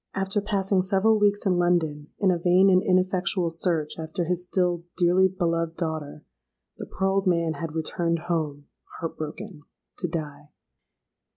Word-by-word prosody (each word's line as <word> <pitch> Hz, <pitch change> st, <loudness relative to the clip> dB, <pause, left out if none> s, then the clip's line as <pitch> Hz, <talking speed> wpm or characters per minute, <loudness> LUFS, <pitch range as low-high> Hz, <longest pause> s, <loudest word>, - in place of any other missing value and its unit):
After 195 Hz, +2 st, -1 dB
passing 195 Hz, -2 st, +1 dB
several 200 Hz, +3 st, +2 dB
weeks 205 Hz, 0 st, +2 dB
in 185 Hz, -2 st, +2 dB
London 160 Hz, -4 st, +1 dB
in 195 Hz, -3 st, +3 dB
a 175 Hz, -, 0 dB
vain 185 Hz, +3 st, +4 dB
and 185 Hz, 0 st, +5 dB
ineffectual 185 Hz, -1 st, +1 dB
search 165 Hz, -2 st, -1 dB
after 160 Hz, +2 st, -3 dB
his 180 Hz, +1 st, -1 dB
still 180 Hz, -2 st, 0 dB
dearly 180 Hz, +1 st, +4 dB
beloved 170 Hz, -3 st, -2 dB
daughter, 155 Hz, -3 st, -4 dB, 0.5 s
the -, -, -6 dB
poor 190 Hz, -, -1 dB
old 195 Hz, 0 st, +1 dB
man 170 Hz, -2 st, +2 dB
had 165 Hz, -1 st, -5 dB
returned 165 Hz, +1 st, -1 dB
home, 150 Hz, -4 st, -2 dB, 0.3 s
heart 165 Hz, -, -4 dB
broken—to 175 Hz, +2 st, -8 dB
die! 150 Hz, -3 st, -6 dB
175 Hz, 150 wpm, -25 LUFS, 165-190 Hz, 0.5 s, and